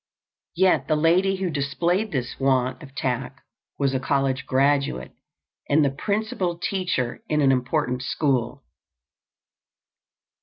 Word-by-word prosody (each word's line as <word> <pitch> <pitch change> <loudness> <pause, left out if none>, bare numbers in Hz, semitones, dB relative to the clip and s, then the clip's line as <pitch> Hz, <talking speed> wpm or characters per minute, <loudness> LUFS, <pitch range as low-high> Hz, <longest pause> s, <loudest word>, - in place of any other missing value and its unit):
Yet 185 +1 +3
the 155 - +2
lady 175 +5 +3
who 185 -2 -2
displayed 170 +8 0
this 125 -4 -3
want 130 0 +1
of 140 -3 -13
tact 130 +1 -3 0.4
was 140 -2 +1
a 130 - +1
college 135 0 0
graduate 135 - +1 0.6
and 145 +1 +4
the 140 - +1
principal 200 +1 -2
teacher 180 - -2
in 150 - +1
an 140 -2 +4
important 125 0 0
school. 130 -1 -1
140 Hz, 120 wpm, -24 LUFS, 130-170 Hz, 0.6 s, and